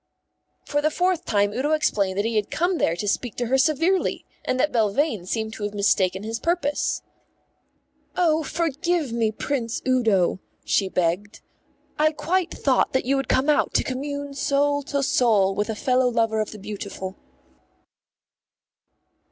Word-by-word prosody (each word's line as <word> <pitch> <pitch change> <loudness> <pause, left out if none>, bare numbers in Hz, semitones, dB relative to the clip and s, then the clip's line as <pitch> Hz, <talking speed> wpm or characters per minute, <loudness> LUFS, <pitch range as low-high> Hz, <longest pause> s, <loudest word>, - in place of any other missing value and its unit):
For 290 0 0
the 305 - +2
fourth 360 +1 0
time 205 -1 +2
Udo 275 +8 0
explained 200 -11 +1
that 205 - +1
he 230 0 -1
had 210 -1 0
come 350 +1 0
there 165 - +2
to 205 +4 -4
speak 235 +3 -1
to 245 - -2
her 260 +3 +2
severely, 325 +6 +1 0.2
and 255 - -1
that 300 +3 +2
Belvane 220 - 0
seemed 220 +1 -2
to 215 - -7
have 205 0 -3
mistaken 195 -1 +1
his 225 +1 -4
purpose. 335 -3 -1 1.1
"Oh, 320 -3 +3
forgive 325 -1 -1
me, 225 -2 +1
Prince 230 0 -2
Udo," 220 -9 +2 0.3
she 195 -2 +1
begged. 185 +4 -1 0.6
"I 310 +1 +3
quite 335 +4 0
thought 265 -3 +1
that 260 - +1
you 270 +2 +2
had 270 - -2
come 260 +3 +2
out 300 - +2
to - - +3
commune 285 +2 -4
soul 285 +1 +1
to 280 -1 0
soul 215 -7 +3
with 205 +3 -2
a 220 - -2
fellow 255 +3 +2
lover 225 -2 +1
of 215 - -3
the 215 - -9
beautiful." 200 -2 -6
250 Hz, 160 wpm, -24 LUFS, 210-295 Hz, 1.1 s, Oh